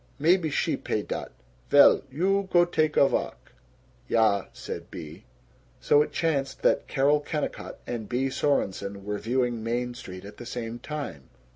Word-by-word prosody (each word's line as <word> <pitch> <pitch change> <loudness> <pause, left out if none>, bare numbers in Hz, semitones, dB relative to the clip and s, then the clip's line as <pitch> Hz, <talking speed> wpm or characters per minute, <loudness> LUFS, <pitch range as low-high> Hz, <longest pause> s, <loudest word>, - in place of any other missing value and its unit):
Maybe 165 +2 +3
she - - 0
pay - - -2
dat. - - -5 0.4
Vell. 145 - +7
You 190 +7 0
go 175 -1 +6
take 155 -3 0
a 140 - +7
valk." - - -3 0.6
"Ya," 110 -4 +3
said - - -7
Bea. 75 0 -9 0.5
So 145 - +4
it - - -1
chanced 140 -5 -1
that - - +2
Carol 145 +2 +3
Kennicott 150 0 -4
and 115 -4 -5
Bea 130 +2 0
Sorenson 100 -8 -1
were 105 0 -3
viewing 120 -1 -1
Main 120 +2 -1
Street 95 -6 -9
at 105 +1 -11
the 120 - -9
same 120 -1 -5
time. 140 - -6
130 Hz, 155 wpm, -27 LUFS, 110-150 Hz, 0.6 s, Vell